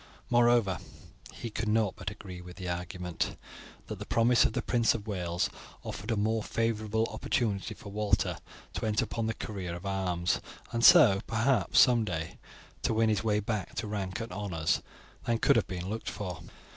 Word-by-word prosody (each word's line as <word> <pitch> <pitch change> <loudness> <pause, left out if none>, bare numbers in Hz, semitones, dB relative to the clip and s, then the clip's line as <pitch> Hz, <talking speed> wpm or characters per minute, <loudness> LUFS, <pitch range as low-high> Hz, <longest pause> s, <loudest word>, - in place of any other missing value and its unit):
Moreover, 120 -7 +4 0.5
he 115 - -7
could 110 +1 -3
not 110 -2 +2
but - - -4
agree 95 -3 -9
with 90 0 -11
the 95 -2 -5
argument, 90 0 -3 0.5
that - - -6
the - - -6
promise 115 +1 +4
of - - +1
the - - -1
Prince 120 -2 +2
of 105 -3 -5
Wales 90 -5 -1 0.4
offered 105 +4 -6
a 115 - +1
more 110 +2 +1
favourable 110 0 0
opportunity 110 -2 -1
for 100 - -10
Walter 105 -1 +1 0.4
to - - -3
enter 105 0 +2
upon 115 -1 -2
the 115 - -1
career 95 -5 -5
of 85 - -9
arms 90 -3 0 0.3
and 115 0 -1
so, 125 - +8
perhaps, 120 +4 +3
someday 105 -10 +2 0.4
to 110 - 0
win 110 0 +3
his 105 -1 +1
way 105 -2 +2
back 105 -2 -3
to - - -2
rank 100 -1 -3
and 115 -3 -5
honours 90 -5 -1 0.4
than 115 -1 +1
could - - +4
have 115 - +2
been 90 -1 -5
looked 110 0 -3
for. 95 -3 -5
105 Hz, 180 wpm, -30 LUFS, 95-115 Hz, 0.5 s, so